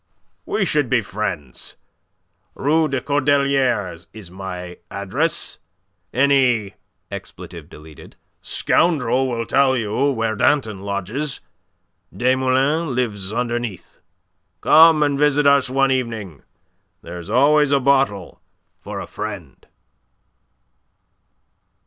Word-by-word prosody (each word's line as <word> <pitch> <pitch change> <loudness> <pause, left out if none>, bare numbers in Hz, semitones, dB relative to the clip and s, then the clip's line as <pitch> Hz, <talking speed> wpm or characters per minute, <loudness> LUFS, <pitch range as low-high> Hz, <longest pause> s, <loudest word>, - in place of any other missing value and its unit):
We - - 0
should - - +1
be - - +2
friends. 65 -4 -5 0.8
Rue 155 +3 +2
des 135 -3 -2
Cordeliers 135 - +1
is 100 -5 -11
my 90 -2 -7
address. 110 - -2 0.5
Any 125 -6 +2 1.7
scoundrel 135 -6 +1
will 115 -1 -2
tell 130 +2 +3
you 120 +5 0
where 115 -3 -1
Danton 110 -4 +1
lodges. 100 +9 -3 0.7
Desmoulins 130 +5 +1
lives 110 -7 -2
underneath. 120 -3 -4 0.6
Come 160 -1 +6
and 145 -1 0
visit 150 0 +3
us 140 -2 +4
one 135 +1 +2
evening. 115 - -3 0.6
There's 85 +2 -8
always 145 +5 +4
a 140 - +4
bottle 135 -9 0 0.4
for - - -7
a - - -5
friend." 100 - -8
125 Hz, 95 wpm, -20 LUFS, 100-140 Hz, 1.7 s, Come